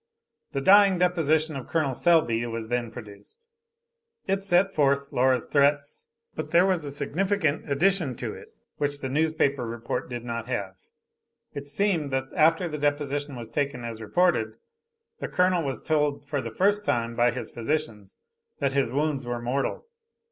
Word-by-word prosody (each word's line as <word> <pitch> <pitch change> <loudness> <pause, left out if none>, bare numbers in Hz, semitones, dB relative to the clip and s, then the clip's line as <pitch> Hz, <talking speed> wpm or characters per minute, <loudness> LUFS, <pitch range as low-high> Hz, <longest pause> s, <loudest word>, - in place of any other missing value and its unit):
The 140 - -1
dying 195 +3 +6
deposition 160 -3 +1
of 135 -3 -7
Col. 155 -5 0
Selby 130 -7 +2
was 115 -1 -5
then 120 -1 -1
produced. 120 - -12 0.8
It 195 0 0
set 195 0 +2
forth 140 -1 +2
Laura's 130 0 +2
threats, 145 - +1 0.3
but - - -5
there 175 +2 +5
was 185 -4 +1
a 145 - -5
significant 155 +2 -1
addition 165 -2 +2
to - - -5
it, - - -11 0.3
which 145 -1 -1
the 135 - -3
newspaper 145 -2 +1
report 115 +1 -4
did 120 -1 -6
not 115 -1 -4
have. 100 -7 -3 0.8
It 140 0 -6
seemed 165 -1 0
that 135 0 -2
after 165 +3 +3
the 150 -2 -5
deposition 145 -1 -1
was 115 -2 -8
taken 140 -2 -2
as 115 -1 -6
reported, 110 - +1 0.6
the - - -3
Colonel 180 -1 +2
was 135 -2 -3
told 150 -2 0
for 145 -1 -2
the 115 - -5
first 205 - +2
time 115 - -1
by 120 +1 +4
his 120 -2 -5
physicians 115 -6 -3 0.4
that 140 -2 -1
his 135 -4 +1
wounds 140 +1 -1
were 120 0 -3
mortal. 130 - -2
140 Hz, 160 wpm, -26 LUFS, 120-165 Hz, 0.8 s, dying